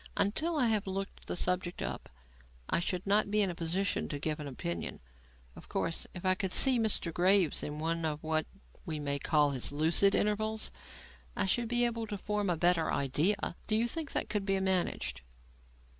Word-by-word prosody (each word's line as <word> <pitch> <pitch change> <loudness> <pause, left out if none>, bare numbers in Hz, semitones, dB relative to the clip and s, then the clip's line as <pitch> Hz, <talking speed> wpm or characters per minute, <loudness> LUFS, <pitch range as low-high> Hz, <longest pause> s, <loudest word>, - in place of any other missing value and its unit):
Until 315 +11 +1
I 260 - +3
have 215 -3 0
looked 195 +1 -5
the - - -2
subject 180 0 0
up, - - -5 0.6
I - - +1
should 180 +1 -2
not 205 +1 +3
be 210 0 +3
in 190 - 0
a - - -5
position 175 +4 -1
to 145 - -3
give 155 +1 -2
an 150 - -5
opinion. 85 -11 -4 0.6
Of - - -13
course, 165 - -2
if 180 - -7
I 185 - +4
could 190 0 -2
see 260 +2 +6
Mr. 210 -6 0
Graves 180 -2 +3
in 150 0 -5
one 165 +2 -1
of 155 -1 -2
what 155 0 0 0.4
we 160 -5 -4
may 140 -1 -1
call 150 0 +2
his 130 -1 -2
'lucid 165 +7 +3
intervals' 215 +1 0 0.6
I 205 - 0
should 235 +5 +1
be 240 +1 +3
able 230 -1 -2
to 205 - -4
form 205 0 -2
a 175 - +1
better 175 -1 +2
idea. 165 +9 +1
Do 215 - +2
you 230 +2 +2
think 315 +2 -2
that - - 0
could 210 -2 -1
be 195 -1 +1
managed?" 180 - -1
185 Hz, 195 wpm, -31 LUFS, 160-210 Hz, 0.6 s, see